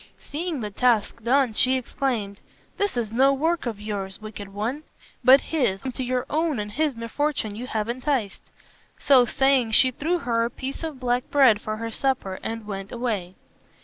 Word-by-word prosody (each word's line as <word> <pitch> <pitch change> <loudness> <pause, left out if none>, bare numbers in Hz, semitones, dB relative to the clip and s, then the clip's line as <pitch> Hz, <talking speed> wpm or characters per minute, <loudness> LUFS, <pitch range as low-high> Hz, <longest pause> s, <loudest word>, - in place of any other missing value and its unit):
Seeing 315 -2 -4
the 210 -1 -4
task 230 0 +1
done, 255 0 +3
she 255 +4 +3
exclaimed, 235 -6 -3 0.4
"This 405 -9 -1
is 225 -3 -2
no 265 +4 +4
work 320 +1 0
of 220 -4 -4
yours, 200 -2 -5
wicked 210 -2 -8
one, 225 +9 -3 0.4
but 260 +3 +8
his, 240 -12 -1
whom 260 - -3
to 260 - -4
your 250 0 -1
own 310 -1 0
and 210 0 -4
his 295 +3 0
misfortune 230 -1 -2
you 245 +4 -6
have 215 -3 -2
enticed." 245 -4 -2 0.5
So 260 -3 +5
saying, 260 -2 +2
she 255 +3 +6
threw 320 +8 -1
her 230 -7 0
a 235 - 0
piece 270 +5 -6
of 310 -5 -5
black 245 0 -1
bread 255 -7 +5
for 215 0 -4
her 230 +1 -4
supper 255 -7 -1
and 225 -1 -5
went 195 -2 -6
away. 215 -7 -3
245 Hz, 180 wpm, -24 LUFS, 215-270 Hz, 0.5 s, but